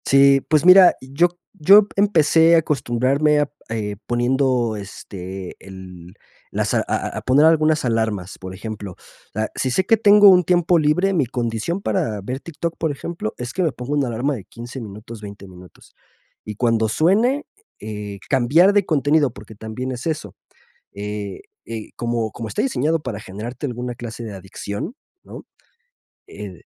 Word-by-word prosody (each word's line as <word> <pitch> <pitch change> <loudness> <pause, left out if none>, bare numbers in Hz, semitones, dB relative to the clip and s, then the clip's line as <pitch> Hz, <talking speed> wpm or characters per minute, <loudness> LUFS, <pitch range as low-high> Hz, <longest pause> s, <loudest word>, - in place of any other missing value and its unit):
Sí. 135 0 +5
Pues 155 0 +3
mira, 185 0 +8
yo 140 +7 +2
c 175 - -28 0.3
yo 200 +5 +8
p - - -18
empecé 165 -4 +4
a - - +6
acostumbrarme 140 +1 +1
a 145 - +2
p 145 - -23 0.4
eh, 100 - -8
poniendo, 120 -1 +1
este, 95 -2 -8
el 90 -2 -12 0.3
las - - -2
a - - +3
a - - -1
a - - -4
a - - -12
poner 140 +4 +4
algunas 155 -2 +3
alarmas, 110 -5 -1
por 95 0 -8
ejemplo, 100 -1 -7 0.4
ah, 110 +1 -1
si 130 - -1
sé 185 +9 0
que 225 - +5
tengo 205 -1 +7
un 180 -1 +6
tiempo 175 0 +3
libre, 180 +6 +2
mi 155 -7 +2
condición 120 - -3
para 150 - -1
ver 125 +7 -5
TikTok, 170 +2 -5
por 160 -2 -1
ejemplo, 145 -4 -5
es 125 0 -6
que 185 - -2
me 160 - +1
ponga 125 +1 -7
una 145 -3 +1
alarma 120 +5 -1
de 100 -6 -9
15 120 +2 -9
minutos, 110 +1 -10
20 100 -1 -10
minutos, 90 -1 -16 0.5
y 105 - -7
cuando 115 -1 +1
suene, 225 - +2 0.3
eh 105 -1 -6
eh, - - -13
cambiar 145 +10 +4
de 205 -2 +3
contenido, 145 -3 +2
porque 110 +1 -12
también 110 +5 -5
es 125 +4 -5
eso, 155 -1 -4 0.6
eh, 100 -1 -6 0.2
eh, 115 -2 -7
como 115 -2 -2
como 115 -2 -6
está 105 - -2
diseñado 165 - 0
para 120 -7 -5
generarte 115 +8 -6
alguna 125 -1 -5
clase 120 -1 -8
de 110 - -6
adicción, 100 - -6 0.3
¿no? - - -11 0.8
El 95 -5 -10
125 Hz, 175 wpm, -21 LUFS, 110-160 Hz, 0.8 s, mira